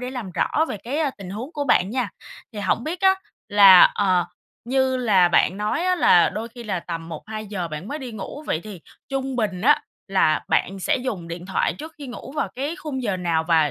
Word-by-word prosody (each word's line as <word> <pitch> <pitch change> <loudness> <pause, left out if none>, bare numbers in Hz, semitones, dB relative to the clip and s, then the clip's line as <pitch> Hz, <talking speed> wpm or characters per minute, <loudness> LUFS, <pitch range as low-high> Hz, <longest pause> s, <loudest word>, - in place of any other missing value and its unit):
để 250 0 -4
làm 240 -8 -6
rõ 315 - +1
về - - -4
cái, 255 +9 -4
ờ, 300 -4 +1
tình 185 -2 -8
huống 245 - -6
của 290 -2 -3
bạn 200 -6 +3
nha. 250 -4 -1 0.4
Thì 210 - -8
hổng 230 - 0
biết 335 +3 -4
á, 380 -1 +5 0.3
là, 200 -3 +9
ờ, 185 -4 +2 0.4
như 260 +1 +1
là 200 -8 +4
bạn 180 +2 +3
nói 210 - -1
á 365 0 +3
là 175 - +5
đôi 225 +2 -5
khi 240 0 -11
là 190 -5 -2
tầm 165 -1 -6
1:00-2:00 200 +1 -5
bạn 155 +6 -7
mới 295 - -4
đi 255 -4 -7
ngủ, 220 +8 -7
vậy 160 - -1
thì 205 -6 -9 0.3
trung 270 -1 -3
bình 200 -6 -1
á 295 +6 +4 0.3
là 175 -5 +3
bạn 195 +1 0
sẽ 185 - +1
dùng 215 -10 -4
điện 170 +2 -7
thoại 190 - 0
trước 315 +2 -9
khi 285 - -8
ngủ 250 +2 -9
vào 200 - 0
cái 285 +7 -3
khung 295 -8 -5
giờ 200 -5 -1
nào? 165 -3 0
Và 160 -3 +4
215 Hz, 230 wpm, -23 LUFS, 185-265 Hz, 0.4 s, là